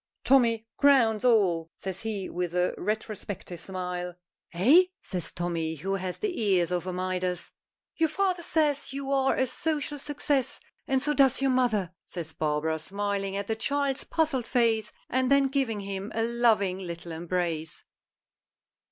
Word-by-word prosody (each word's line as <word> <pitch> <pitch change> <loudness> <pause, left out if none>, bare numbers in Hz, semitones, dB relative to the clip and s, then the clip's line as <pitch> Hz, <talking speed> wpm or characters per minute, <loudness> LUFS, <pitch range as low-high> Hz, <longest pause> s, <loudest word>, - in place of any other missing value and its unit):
"Tommy 230 -4 +4
crowns 245 -7 +4
all!" 185 -9 +3
says 190 -1 -5
he 210 -4 -3
with 180 -1 -3
a 180 0 +2
retrospective 205 -4 -4
smile. 180 -1 -4 0.4
"Eh?" 265 - +6 0.2
says 180 -3 -3
Tommy, 165 -2 -2
who 190 +6 -3
has 185 -2 -3
the 380 - -2
ears 185 -5 +2
of 180 0 -1
a - - -1
Midas. 180 0 -2 0.5
"Your 320 -1 +3
father 370 +1 0
says 300 -4 +1
you 275 0 -4
are 270 -1 +3
a 260 - +2
social 295 +2 -2
success, 280 -2 0 0.3
and 265 -1 +1
so 295 0 +2
does 270 -3 +4
your 270 -1 +2
mother," 220 -8 +1
says 165 -3 -7
Barbara, 155 +1 0
smiling 195 +2 -2
at 200 - -2
the 220 - -1
child's 280 +4 -1
puzzled 300 -8 0
face, 225 -3 +2 0.2
and 260 0 +1
then 280 -1 +4
giving 260 -7 0
him 195 +1 -5
a 225 - +1
loving 225 -5 +2
little 170 -2 -6
embrace. 165 -1 -3
210 Hz, 150 wpm, -28 LUFS, 180-270 Hz, 0.5 s, Eh